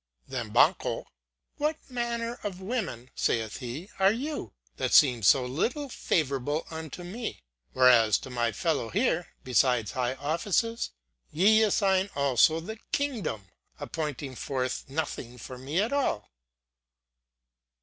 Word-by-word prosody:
Then - - -4
Banquho: - - +3 0.5
"What 300 +2 +1
manner 235 -1 -3
of 195 -3 -4
women 190 - -4
(saith 110 -3 0
he) 135 - -7
are 195 +1 +6
you 255 - -4 0.3
that - - -1
seem 125 -6 +6
so 125 +6 +5
little 240 - -1
favourable 145 - -1
unto 160 +2 -7
me, 215 - -6 0.3
whereas 120 -5 +6
to 130 - -9
my 120 -2 0
fellow 120 -1 -1
here, 190 -5 +1 0.2
besides 125 -4 +2
high 125 0 -1
offices, 180 - 0 0.4
ye 210 +7 +5
assign 195 -2 +3
also 140 +3 +4
the 220 +7 -7
kingdom, 220 - -2 0.3
appointing 150 -4 -4
forth 130 0 -3
nothing 135 -4 -4
for 125 +2 -9
me 140 +7 -2
at 220 +7 +1
all?" 265 - 0
155 Hz, 125 wpm, -28 LUFS, -, 0.5 s, are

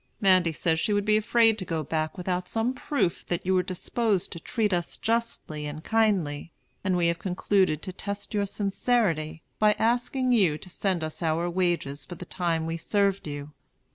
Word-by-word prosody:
Mandy 185 -4 +4
says 160 0 0
she 210 - +1
would 205 0 +1
be 215 0 +4
afraid 225 +1 +3
to - - -2
go 165 -3 -2
back 155 +4 -2
without 180 0 -2
some 225 +5 0
proof 260 - -1
that 175 - -2
you 190 - +2
were 185 - +4
disposed 195 +2 -1
to 170 - -6
treat 210 +3 0
us 175 -1 -1
justly 225 -10 -2
and 150 +2 -7
kindly; 185 -10 +1 0.3
and 185 -2 +1
we 175 - +2
have 170 0 +1
concluded 185 -3 +1
to 185 - -5
test 200 +2 -5
your 205 -1 +1
sincerity 195 -6 0 0.2
by 210 0 +5
asking 245 +3 +1
you 190 -11 +4
to 185 - -11
send 185 -3 0
us 155 +2 -5
our 165 +1 +1
wages 175 -6 -1
for 175 - -8
the 180 - -8
time 170 -3 -1
we 165 +1 -2
served 200 +1 +1
you. 145 0 -6
185 Hz, 190 wpm, -27 LUFS, 165-210 Hz, 0.3 s, by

